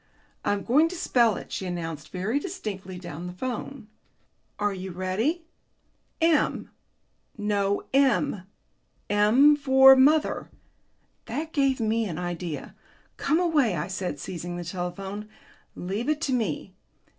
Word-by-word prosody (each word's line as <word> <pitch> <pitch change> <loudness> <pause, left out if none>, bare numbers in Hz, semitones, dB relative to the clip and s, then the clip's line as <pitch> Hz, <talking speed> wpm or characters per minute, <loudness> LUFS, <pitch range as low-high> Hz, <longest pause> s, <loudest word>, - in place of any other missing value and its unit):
"I'm 205 -1 0
going 295 +7 +4
to 355 - -6
spell 240 - +3
it," - - -9
she 190 - -3
announced 165 -4 -5
very 200 +9 -1
distinctly 195 - -6
down 175 -1 -7
the 180 - -7
telephone. 250 +3 -5 0.7
"Are 205 -1 0
you 190 0 -6
ready?... 200 - -1 0.7
M... 330 -2 +2 0.7
No, 205 -1 0
M. 260 -8 +2 0.6
M 230 +9 +6
for 265 -2 +7
mother." 295 +4 +3 0.8
That 320 +2 -4
gave 275 -3 +2
me 225 0 +1
an 170 -6 -4
idea. 175 -4 -5 0.4
"Come 310 +4 +1
away," 300 - +2
I 150 - -2
said, 190 -5 -4
seizing 175 +3 -5
the 175 - -4
telephone; 190 +4 -5 0.5
"leave 200 +9 -3
it 305 -1 +1
to 270 - 0
me. 195 - -2
210 Hz, 130 wpm, -26 LUFS, 180-270 Hz, 0.8 s, for